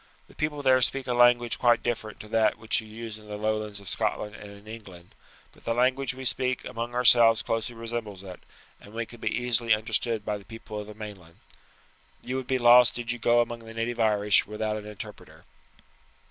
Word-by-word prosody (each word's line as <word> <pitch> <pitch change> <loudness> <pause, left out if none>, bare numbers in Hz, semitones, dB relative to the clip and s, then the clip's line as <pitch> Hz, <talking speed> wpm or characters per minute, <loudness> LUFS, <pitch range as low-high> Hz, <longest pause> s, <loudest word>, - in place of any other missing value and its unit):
The - - -18
people 150 -1 -3
there 130 -1 +5
speak 135 +2 0
a 125 - -1
language 120 -1 +4
quite 120 -1 +3
different 110 -3 -3
to 105 - -11
that 110 0 +2
which 110 +1 0
you 110 - -13
use 110 0 -8
in 105 - -16
the 105 0 -6
lowlands 110 -1 -2
of 100 - -14
Scotland 105 +3 -2
and 105 -1 -10
in 100 +1 -14
England, 100 -6 -11 0.4
but - - -22
the 115 - -1
language 130 +2 +1
we 130 0 -7
speak 130 0 0
among 120 +1 -5
ourselves 120 -2 +6
closely 115 +1 -2
resembles 115 -4 -5
it, 90 -2 -9 0.4
and 105 +2 -15
we 115 0 -2
can 120 +2 -14
be 110 - 0
easily 120 -1 +2
understood 110 0 -1
by 105 -1 -2
the - - -15
people 110 -1 -8
of 105 - -7
the 105 - -10
mainland. 100 -6 -10 0.9
You 130 - -4
would 130 -1 -5
be 130 - +1
lost 120 0 +6
did 120 -1 -3
you 120 - -4
go 120 +1 +4
among 120 0 -3
the 115 -1 -12
native 115 +1 -2
Irish 105 -2 +3
without 105 0 -2
an 105 0 -7
interpreter." 105 -2 -10
115 Hz, 210 wpm, -27 LUFS, 105-120 Hz, 0.9 s, ourselves